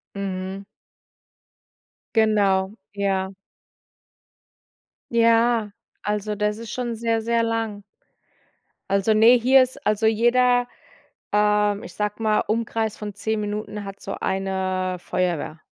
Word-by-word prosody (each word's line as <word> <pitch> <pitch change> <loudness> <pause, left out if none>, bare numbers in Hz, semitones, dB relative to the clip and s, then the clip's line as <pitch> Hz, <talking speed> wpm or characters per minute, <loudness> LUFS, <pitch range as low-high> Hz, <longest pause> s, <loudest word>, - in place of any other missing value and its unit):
Mhm. 195 0 -4 1.5
Genau, 205 -3 +3 0.2
ja. 195 -1 -1 1.8
Ja, 230 -1 +3 0.3
also 210 0 -2
das 210 +1 -1
ist 230 -1 -8
schon 240 -2 -3
sehr, 225 0 0
sehr 230 +1 +1
lang. 225 -3 -2 1.1
Also, 200 +2 +2
ne, 230 +3 +7
hier 260 +3 +6
ist 260 +3 -4
also 215 +1 +2
jeder, 245 +2 +3 0.7
ähm, 210 0 +2
ich - - -10
sage 210 +1 -3
mal 215 -1 +2
Umkreis 220 0 -1
von 210 -1 -6
10 220 +2 -2
Minuten, 210 0 -4
hat 195 0 -9
so 195 - -5
eine 190 -1 -1
Feuerwehr. 170 -3 -2
210 Hz, 110 wpm, -23 LUFS, 195-230 Hz, 1.8 s, ne